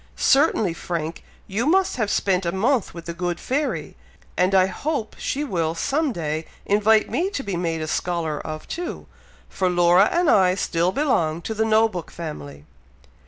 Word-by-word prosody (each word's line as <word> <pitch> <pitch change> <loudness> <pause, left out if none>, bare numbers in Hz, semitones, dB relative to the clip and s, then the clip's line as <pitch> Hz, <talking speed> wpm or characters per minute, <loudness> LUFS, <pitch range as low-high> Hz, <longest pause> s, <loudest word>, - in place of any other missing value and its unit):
Certainly, 265 - +3
Frank, 165 -1 -4 0.2
you 220 +7 -2
must 375 -1 +2
have 215 -4 0
spent 190 -2 +1
a 170 - -1
month 225 +5 +1
with 170 -1 -10
the 170 - -4
good 175 0 -3
fairy; 285 +3 -2 0.4
and 185 +2 +2
I 185 -1 +6
hope 225 - -3
she 285 - -2
will 170 - -1
some 285 - 0
day 160 -4 -3 0.2
invite 215 +2 +3
me 365 +3 -1
to 285 -9 -4
be 200 -3 -3
made 165 -2 -2
a - - -4
scholar 165 -2 -2
of 155 0 -7
too, 345 +1 -5 0.4
for 185 -1 -1
Laura 175 0 +5
and 350 -1 +2
I 185 -7 +4
still 175 -2 0
belong 175 - 0
to 220 - -3
the 220 +1 0
No 220 0 +4
book 180 -6 -7
family." 70 - -8
185 Hz, 175 wpm, -23 LUFS, 170-240 Hz, 0.4 s, I